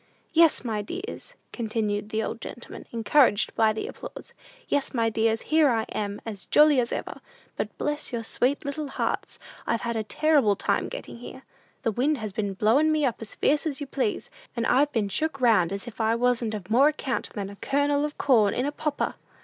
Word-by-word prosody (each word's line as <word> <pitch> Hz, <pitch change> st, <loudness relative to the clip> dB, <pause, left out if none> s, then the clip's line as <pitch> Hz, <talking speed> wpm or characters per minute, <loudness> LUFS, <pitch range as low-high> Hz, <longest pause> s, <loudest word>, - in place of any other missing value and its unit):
"Yes, 330 Hz, -1 st, +5 dB
my 215 Hz, -3 st, -1 dB
dears," 385 Hz, -, -7 dB, 0.2 s
continued 215 Hz, -3 st, -2 dB
the 220 Hz, 0 st, -1 dB
old 225 Hz, -, -5 dB
gentleman, 240 Hz, -, -9 dB
encouraged 230 Hz, -1 st, +3 dB
by 220 Hz, -1 st, +3 dB
the 215 Hz, -, -4 dB
applause, -, -, -9 dB, 0.3 s
"yes, 285 Hz, -2 st, -1 dB
my 230 Hz, -1 st, +2 dB
dears, 225 Hz, 0 st, +1 dB
here 310 Hz, -2 st, +6 dB
I 225 Hz, -3 st, +1 dB
am, 205 Hz, -1 st, -3 dB
as 210 Hz, -4 st, -7 dB
jolly 300 Hz, -2 st, +6 dB
as 235 Hz, -1 st, 0 dB
ever! -, -, -5 dB, 0.3 s
But -, -, -4 dB
bless 295 Hz, 0 st, -2 dB
your 235 Hz, -2 st, -3 dB
sweet 260 Hz, +6 st, 0 dB
little 290 Hz, +1 st, -3 dB
hearts, 270 Hz, -, -3 dB, 0.3 s
I've 230 Hz, -, 0 dB
had 235 Hz, -1 st, -2 dB
a 220 Hz, -, -1 dB
terrible 280 Hz, -3 st, +3 dB
time -, -, 0 dB
getting -, -, -7 dB
here! 260 Hz, +2 st, -10 dB, 0.4 s
The 230 Hz, -, +1 dB
wind 275 Hz, +7 st, +1 dB
has 215 Hz, -4 st, -5 dB
been 200 Hz, -2 st, -2 dB
blowin' 255 Hz, +11 st, +3 dB
me 305 Hz, -2 st, +2 dB
up 245 Hz, -, 0 dB
as 220 Hz, -, -7 dB
fierce 295 Hz, +2 st, +1 dB
as 285 Hz, -3 st, -2 dB
you 290 Hz, -, -4 dB
please, 400 Hz, -, -2 dB, 0.3 s
and 230 Hz, -, 0 dB
I've 285 Hz, +5 st, +3 dB
been 225 Hz, -6 st, 0 dB
shook 275 Hz, +9 st, -2 dB
round 220 Hz, -9 st, +4 dB
as 200 Hz, +4 st, -5 dB
if 235 Hz, -1 st, -6 dB
I 220 Hz, +1 st, +2 dB
wasn't 235 Hz, -2 st, +1 dB
of 200 Hz, -1 st, -8 dB
more 265 Hz, +5 st, +6 dB
account 270 Hz, -6 st, -2 dB
than 200 Hz, -1 st, -4 dB
a -, -, -10 dB
kernel 285 Hz, +3 st, +1 dB
of 300 Hz, 0 st, -3 dB
corn 220 Hz, -7 st, +3 dB
in 255 Hz, -, 0 dB
a 290 Hz, -, -1 dB
popper! 295 Hz, 0 st, -2 dB
240 Hz, 205 wpm, -26 LUFS, 220-290 Hz, 0.4 s, here